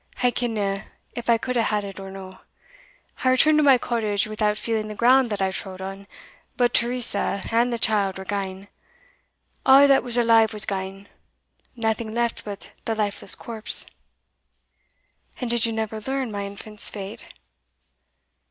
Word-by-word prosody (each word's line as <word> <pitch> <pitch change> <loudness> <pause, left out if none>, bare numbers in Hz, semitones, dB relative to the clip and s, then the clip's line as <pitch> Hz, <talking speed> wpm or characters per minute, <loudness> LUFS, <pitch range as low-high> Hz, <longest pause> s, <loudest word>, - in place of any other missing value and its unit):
"I 245 - +4
kenna 210 -5 -2 0.3
if 240 0 -6
I 230 - +5
could 250 +2 -4
hae 235 - +3
had 210 -2 0
it 195 -1 -8
or 195 0 -8
no. 190 -1 -10 0.8
I 255 - +4
returned 305 +4 +4
to - - +3
my 275 -3 +6
cottage 220 -4 -1
without 215 -1 -1
feeling 220 -2 -2
the 215 - -7
ground 250 +2 +4
that 205 -2 -2
I 190 - 0
trode 190 0 -7
on; 195 +1 -7 0.5
but 245 -1 +2
Teresa 235 -5 +1
and 235 +2 +2
the 235 - -1
child 205 -4 +1
were 190 - -8
gane 195 -1 -4 1.0
a' 270 +1 +7
that 275 -1 +5
was 245 -1 -2
alive 225 -2 +4
was 210 0 -1
gane 195 0 -5 0.7
naething 220 -1 -2
left 235 -1 -1
but 200 -1 -8
the 225 - -1
lifeless 205 -2 -2
corpse." 225 -1 +3 1.5
"And 245 -2 -2
did 235 -1 +3
you - - -2
never 220 -1 -3
learn 265 0 -3
my 200 -1 -4
infant's 210 +1 -7
fate?" 195 -1 -8
220 Hz, 160 wpm, -24 LUFS, 200-240 Hz, 1.5 s, a